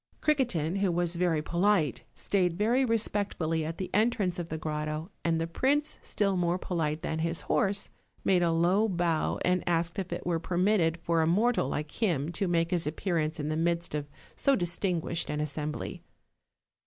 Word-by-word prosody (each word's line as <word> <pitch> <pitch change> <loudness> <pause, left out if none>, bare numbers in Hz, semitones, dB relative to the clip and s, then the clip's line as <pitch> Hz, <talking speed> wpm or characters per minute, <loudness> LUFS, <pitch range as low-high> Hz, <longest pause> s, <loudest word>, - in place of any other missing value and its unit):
Criquetin, 215 - +1
who 195 -2 +2
was 175 0 0
very 170 -3 +1
polite, 175 -4 +1
stayed 180 -4 0
very 235 +6 +3
respectfully 205 -8 0
at 160 +2 -4
the 185 - -4
entrance 205 -4 +1
of 170 -1 -4
the 160 - -3
grotto, 155 +2 -3
and 165 -1 +1
the 165 - 0
prince, 280 - 0
still 200 -2 0
more 175 0 +1
polite 160 -4 -2
than 160 - -2
his 165 +1 0
horse, 200 0 0 0.3
made 185 -2 +3
a 170 - +3
low 180 +7 +3
bow 170 -3 0
and 180 0 +2
asked 170 +2 0
if 185 -2 -4
it 175 - -4
were 170 -2 +1
permitted 175 -1 +2
for 165 -1 +2
a 160 - +2
mortal 210 - +2
like 150 +1 -3
him 165 -7 +1
to 195 +2 -1
make 165 -1 +1
his 175 -4 +1
appearance 160 -1 -1
in 150 0 -2
the 155 - 0
midst 170 +1 0
of 145 -1 -2 0.3
so 275 - +3
distinguished 175 -2 -1
an 150 - -2
assembly. 150 0 -3
170 Hz, 180 wpm, -29 LUFS, 160-195 Hz, 0.3 s, very